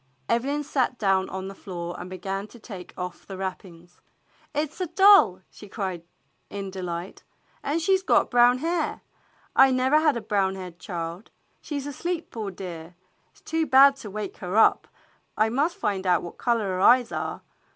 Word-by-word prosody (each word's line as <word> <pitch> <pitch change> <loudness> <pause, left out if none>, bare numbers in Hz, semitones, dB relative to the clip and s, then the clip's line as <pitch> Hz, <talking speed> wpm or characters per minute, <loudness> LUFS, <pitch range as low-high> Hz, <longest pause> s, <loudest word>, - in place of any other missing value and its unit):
Evelyn 275 +5 0
sat 260 -3 0
down 195 -3 +1
on 190 0 -5
the 195 - -7
floor 175 -3 -6
and 180 - -7
began 195 +2 -4
to 240 - -15
take 200 -5 -10
off 180 -1 -6
the 195 - -7
wrappings. 180 -2 -8 0.5
"It 300 -1 -1
is 370 - -10
a 365 - -1
doll! 380 - +6
" - - -44
she 205 - -13
cried 190 -4 -4 0.5
in 200 -1 -6
delight. 180 -1 -6 0.4
"And 300 +4 -1
she 380 +4 +3
's - - -10
got 375 - +2
brown 245 0 +5
hair! 325 +2 -2 0.5
I 270 - +7
never 260 +3 +3
had 305 -5 +2
a - - -4
brown 195 -3 0
haired 180 -2 -9
child. 170 +2 -6 0.3
She 295 -2 -4
's 275 - -7
asleep, 340 +4 -4
poor 220 -3 -4
dear; 175 -3 -8 0.3
it's - - -26
too 320 -1 -1
bad 275 +1 +7
to 220 - -9
wake 210 0 -6
her 185 +3 -3
up, 225 - +4 0.5
but 215 - +3
I 220 - +1
must 295 - 0
find 195 - -2
out 180 -2 +3
what 170 - -9
color 235 -3 +1
her 185 0 -2
eyes 245 +3 +5
are. - - -4
210 Hz, 195 wpm, -25 LUFS, 185-275 Hz, 0.5 s, I